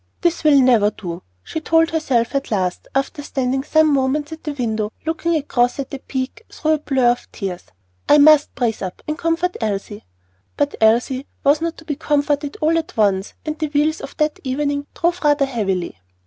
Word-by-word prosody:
"This 340 -1 +1
will 295 -2 +6
never 240 -5 +5
do," 175 -5 -7 0.2
she - - -4
told 325 +1 +3
herself 265 -8 0
at 275 0 -1
last, 185 -4 -1
after 275 +2 -1
standing 265 -2 -1
some 310 0 +3
moments 280 +3 0
at 320 - -9
the 300 - -3
window 220 -5 -2
looking 330 +1 0
across 245 -5 +1
at 275 -1 -5
the 275 - -5
peak 260 +11 -5
through 315 - -1
a 310 - +4
blur 265 -4 +2
of 245 - -5
tears, 185 -4 -5 0.4
"I 295 - +7
must 295 0 +6
brace 235 -4 -1
up 185 -2 -6
and 305 - -1
comfort 335 +2 -1
Elsie." 205 -1 -3 0.5
But 290 0 +1
Elsie 245 +5 +2 0.2
was 290 +2 +3
not 335 0 -2
to 320 - -14
be 295 - -2
comforted 290 -1 0
all 325 +2 +3
at 320 - -8
once, 200 -2 +1
and 310 0 -4
the 310 - 0
wheels 300 +2 0
of - - -9
that 305 -1 0
evening 285 +2 -2
drave 345 +1 +1
rather 290 -1 +3
heavily. 195 - -2
285 Hz, 190 wpm, -20 LUFS, 240-310 Hz, 0.5 s, I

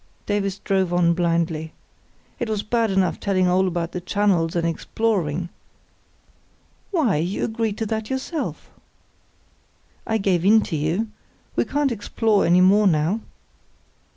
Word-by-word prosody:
Davies 200 -2 -1
drove 190 -2 0
on 175 -1 +3
blindly. 165 -2 -1 0.7
"It 240 -3 -2
was 215 -2 -1
bad 230 0 +1
enough 190 -2 +1
telling 185 -2 +1
all 185 +1 +3
about 170 -1 -2
the 180 - -5
channels 180 -4 +1
and 170 -1 0
exploring——" 175 -2 -1 1.4
"Why, 305 - +1
you 175 +5 -2
agreed 220 -2 -2
to 225 - -2
that 220 0 -3
yourself!" 270 +4 -4 1.4
"I 220 - +1
gave 190 -5 +1
in 215 +3 +6
to 170 - -4
you. 165 +9 -1 0.5
We - - +1
can't 290 -2 0
explore 215 -1 +1
any 175 +2 +5
more 200 +3 +5
now." 165 +5 +1
195 Hz, 135 wpm, -22 LUFS, 170-220 Hz, 1.4 s, in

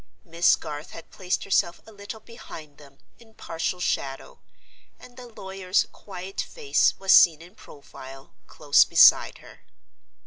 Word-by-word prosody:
Miss 170 0 +2
Garth 150 -1 -9
had 165 - -12
placed 185 -1 -3
herself 175 -3 0
a 220 - -15
little 205 +1 -10
behind 155 -10 -13
them, 140 -2 -18 0.2
in 225 -2 -21
partial 165 +2 -5
shadow; 135 -6 -4 0.6
and 245 - -16
the 250 -1 -12
lawyer's 190 -4 -2
quiet 190 -1 -8
face 445 -4 0
was 195 -1 -1
seen 160 -3 +6
in 175 +3 -16
profile, 135 -6 -14
close 145 -2 +3
beside - - +5
her. - - -16
180 Hz, 140 wpm, -24 LUFS, 150-200 Hz, 0.6 s, seen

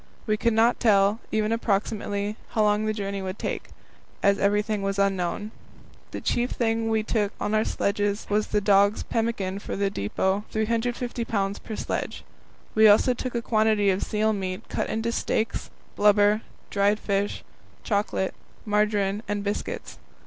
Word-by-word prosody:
We 215 - +2
could 230 +2 +1
not 230 +2 +3
tell, 205 -1 +4
even 215 0 +1
approximately, 205 -1 -1 0.2
how 215 - +3
long 210 +1 +2
the - - +2
journey 200 -2 -3
would 190 +1 -4
take, - - -4 0.6
as 200 0 +4
everything 205 +1 +1
was 195 0 -1
unknown. 195 +1 0 0.6
The - - -6
chief 245 +1 0
thing 225 -1 0
we 220 -1 +1
took 210 -2 0
on 210 - -1
our 215 0 +3
sledges 205 0 -1
was 210 +1 +1
dogs' 200 0 +3
pemmican 215 -4 -1
for - - -5
the 200 0 0
depot, 190 - -1
350 235 +2 -1
pounds 200 -3 -1
per 220 - -7
sledge. - - -3 0.5
We 220 0 +7
also 215 +5 +5
took 250 0 -5
a 235 - -1
quantity 215 -3 +3
of 190 - -1
seal 215 0 +1
meat 185 -2 -4
cut - - -2
into 225 +1 -1
steaks, 225 -1 -1 0.3
blubber, 205 +1 +4 0.3
dried 205 +1 +2
fish, 200 -1 -1 0.4
chocolate, 205 -2 0 0.3
margarine, 210 -1 +1
and 205 -1 -2
biscuits. 205 0 -4
210 Hz, 155 wpm, -26 LUFS, 200-220 Hz, 0.6 s, We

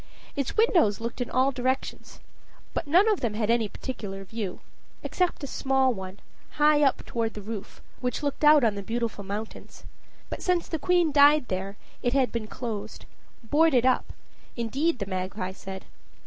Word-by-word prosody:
Its 280 - -3
windows 340 - +4
looked 235 +2 -4
in 245 - -2
all 260 +2 +2
directions, 260 +1 -3 0.5
but - - -3
none 360 +8 +5
of 425 -3 +2
them 225 -4 -2
had 215 0 +1
any 235 -2 +2
particular 195 -5 -6
view 195 -1 -5 0.4
except 360 -4 -1
a - - -1
small 265 -1 +1
one, 190 -1 -8 0.3
high 300 0 +4
up 275 -2 +2
toward 225 -1 -2
the - - -5
roof, 210 -1 -7 0.2
which 250 +3 -2
looked 285 +1 -2
out 300 -2 +7
on 225 -3 +3
the 200 - -5
Beautiful 225 0 -3
Mountains. 205 +3 -7 0.4
But - - -6
since 360 -2 +1
the 320 - -3
queen 350 0 +2
died 290 -1 +5
there 195 +2 -3 0.2
it 245 - 0
had 270 -2 +2
been 230 -2 -3
closed, 220 -3 -6 0.4
boarded 290 0 +3
up, 255 - +2 0.4
indeed, 265 +7 0
the 200 - -3
magpie 185 0 -3
said. 190 0 -8
245 Hz, 170 wpm, -27 LUFS, 210-290 Hz, 0.5 s, out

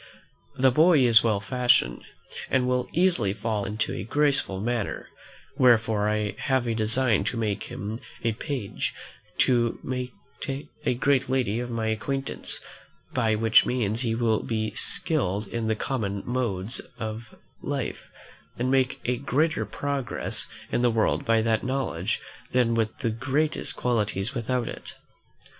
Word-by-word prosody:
The 130 0 +4
boy 155 +2 +5
is 115 -2 +7
well 110 -3 +2
fashioned, 120 - +2 0.5
and 125 -1 +2
will 125 0 0
easily 170 - +3
fall 105 -1 -2
into 105 +2 -2
a 90 - -4
graceful 140 -5 +1
manner; 115 0 -2 0.5
wherefore 110 -4 +4
I 105 -1 0
have 130 -2 +1
a 115 - 0
design 110 -1 +2
to 100 - -2
make 105 -2 -1
him 105 +4 -5 0.2
a 115 - +2
page 120 -2 -3 0.5
to 120 -2 +2 1.0
a - - +2
great 135 +1 +2
lady 125 -4 +1
of 120 0 -4
my 115 -2 -2
acquaintance; 135 +5 -2 0.5
by 115 -4 +2
which 110 +1 +5
means 115 -2 0
he 115 -3 0
will 115 -2 +1
be 110 -1 -1
well - - -16
skilled 105 - 0
in 115 -1 -2
the 110 - +1
common 105 -5 -2
modes 120 -4 -1 0.2
of 110 +1 -6 0.3
life, - - -4 0.5
and 125 +2 0
make 130 -1 +2
a 125 0 +1
greater 150 +5 0
progress 140 -3 -2 0.2
in - - +1
the 125 - +4
world 115 -1 +1
by 115 -1 +3
that 110 -1 +1
knowledge 120 -7 -1 0.3
than 125 -2 +3
with 110 -1 0
the 115 -4 +1
greatest 140 +7 -1
qualities 110 -2 -1
without 125 -1 -1
it. - - -8
115 Hz, 145 wpm, -26 LUFS, 110-130 Hz, 1.0 s, is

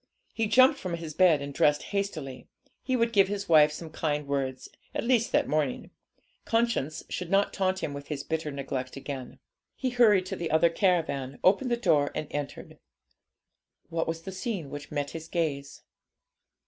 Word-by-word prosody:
He 225 -1 0
jumped 255 +4 +5
from 180 -2 -3
his 165 -2 -7
bed 165 -4 +4
and 140 0 -6
dressed 150 +1 +3
hastily. 155 -11 -3 0.3
He 260 - -1
would 230 -1 +1
give 195 -3 +5
his 200 0 -4
wife 155 -2 +6
some 160 +1 -8
kind 150 -2 -2
words, 135 -2 -2 0.3
at - - -1
least 240 -1 +2
that - - +2
morning. 150 -4 -1 0.5
Conscience 225 - 0
should 180 -2 -5
not 195 +1 +2
taunt 190 0 0
him 145 - -2
with 140 0 -8
his 145 -2 -4
bitter 160 0 -2
neglect 135 -2 -4
again. 135 -2 -7 0.4
He 260 -2 -2
hurried 215 -6 +5
to - - -4
the 170 - -4
other 160 +2 +4
caravan, 160 -8 0
opened 205 +8 +4
the 240 - +1
door, 150 -11 +2
and 155 - -3
entered. 145 -1 -6 1.1
What 165 0 -1
was 165 0 -3
the 190 - -6
scene 190 - -4
which 145 0 -7
met 145 -1 -3
his 160 -1 -7
gaze? 145 -5 -3
165 Hz, 175 wpm, -28 LUFS, 145-195 Hz, 1.1 s, wife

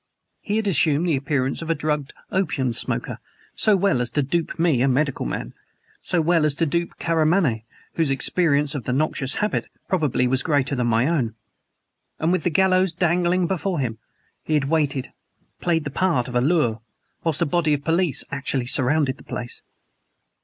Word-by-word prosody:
He 205 - -3
had 220 0 0
assumed 165 -4 +2
the 165 - +2
appearance 135 0 -1
of 165 - -6
a 165 - +2
drugged 150 -3 -2 0.2
opium 145 -10 0
smoker - - -2 0.3
so 215 - +4
well 195 -9 +2
as 120 - -1
to 145 +5 0
dupe 165 +5 -2
me 165 -7 +2
a 135 - +3
medical 140 +1 0
man; - - -5 0.5
so 175 - +1
well 165 0 +2
as 150 -2 +2
to 165 - +1
dupe 170 +3 -2
Karamaneh 160 - +1 0.3
whose 165 -4 +1
experience 145 +1 +2
of 130 -6 -5
the 125 - -1
noxious 140 -1 0
habit 210 0 -1 0.2
probably 150 -8 +1
was 130 +1 +2
greater 145 -4 0
than 125 -3 0
my 115 +1 +2
own. 135 -8 0 0.8
And, 160 +2 0
with 185 - +1
the 175 - +2
gallows 185 0 +2
dangling 175 +1 +2
before 185 0 -1
him, 115 -4 -3 0.4
he 155 - 0
had 145 -2 +1
waited 145 -5 0 0.5
played 165 -3 0
the 140 - -5
part 140 -7 +1
of 125 - -7
a 125 - +2
lure 130 -7 +1 0.4
whilst 160 -3 0
a - - +1
body 155 0 +1
of 145 - -7
police 165 0 +1
actually 135 -2 -1
surrounded 135 +1 +2
the - - -15
place! 120 0 -4
150 Hz, 180 wpm, -23 LUFS, 130-170 Hz, 0.8 s, so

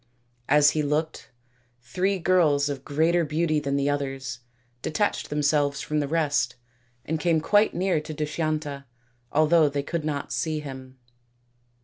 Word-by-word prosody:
As 150 +1 +6
he 155 - 0
looked, 150 +2 -2 0.5
three 185 +10 0
girls 160 -6 +3
of 140 -2 -5
greater 165 +4 +2
beauty 155 0 0
than 140 -1 -2
the 140 0 +1
others 135 -3 -3 0.4
detached 205 - -1
themselves 145 -1 +1
from 150 0 -1
the 145 - -1
rest 145 -6 0 0.5
and 160 +1 -2
came 165 0 +2
quite 205 +7 +3
near 180 -4 +1
to 155 - -8
Dushyanta, 150 -2 -3 0.5
although 155 0 +4
they 140 0 -2
could 165 +2 -3
not 150 -2 -3
see 155 -2 -1
him. 130 -3 -9
150 Hz, 140 wpm, -25 LUFS, 140-160 Hz, 0.5 s, As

